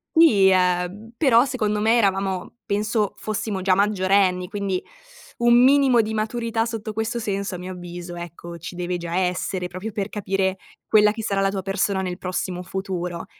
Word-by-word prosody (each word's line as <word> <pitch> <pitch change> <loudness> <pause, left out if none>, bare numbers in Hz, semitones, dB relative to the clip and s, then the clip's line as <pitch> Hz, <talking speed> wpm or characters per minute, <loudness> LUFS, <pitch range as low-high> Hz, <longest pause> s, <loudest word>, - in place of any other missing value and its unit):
Sì, 215 -13 +6
uhm, 180 +4 0
però 250 -4 +5
secondo 215 -6 -1
me 225 +3 +3
eravamo 195 -2 0
penso 210 0 0
fossimo 215 -2 -3
già 185 0 +3
maggiorenni, 190 -2 +2
quindi 195 -3 -2 0.5
un 240 0 +4
minimo 265 -3 +5
di 220 0 -4
maturità 225 +1 -1
sotto 225 -2 -4
questo 220 +2 -2
senso 200 -3 -3
a - - -5
mio 180 +1 -7
avviso, 175 -1 -8
ecco, 170 0 -8
ci 170 +2 -8
deve 180 0 -2
già 170 0 -5
essere, 180 0 -1
proprio 185 +5 -6
per 200 0 -3
capire 195 -2 -1 0.3
quella 210 -1 +5
che 225 0 -6
sarà 200 -2 0
la 195 - +2
tua 195 -1 -3
persona 195 0 0
nel 180 -1 -4
prossimo 180 -1 -3
futuro. 180 -2 -4
195 Hz, 170 wpm, -23 LUFS, 180-215 Hz, 0.5 s, Sì